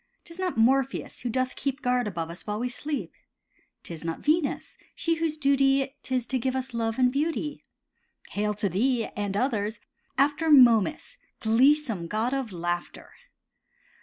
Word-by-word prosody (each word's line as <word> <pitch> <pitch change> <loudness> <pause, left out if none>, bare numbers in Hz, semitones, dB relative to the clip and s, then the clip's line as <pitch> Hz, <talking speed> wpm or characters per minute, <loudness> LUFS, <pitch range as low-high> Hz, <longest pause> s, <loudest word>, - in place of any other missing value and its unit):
'Tis 335 +1 -10
not 370 -6 -2
Morpheus, 265 +3 +1
who 245 - -3
doth 255 +2 -1
keep 275 -1 -3
Guard 250 -2 +1
above 165 -4 -4
us 170 - -12
while 210 0 -2
we 250 +1 -1
sleep, 290 +3 -4 0.7
'Tis 165 -2 -7
not 165 0 -4
Venus, 305 -1 0 0.2
she 330 -1 0
whose 320 -1 -1
duty 275 -1 +2
'Tis 255 -2 -1
to 260 +1 -1
give 260 +1 -1
us 260 -1 -4
love 225 -1 -1
and 250 -1 +4
beauty; 300 +2 -2 0.7
Hail 210 +1 -1
to 205 0 0
these, 230 +6 0
and 205 -1 -2
others, 220 -3 -1 0.4
after 290 +4 +2
Momus, 260 - +5 0.2
gleesome 230 - +3
god 220 +7 -1
of 265 -5 -2
laughter. 175 0 -4
255 Hz, 155 wpm, -27 LUFS, 215-280 Hz, 0.7 s, Momus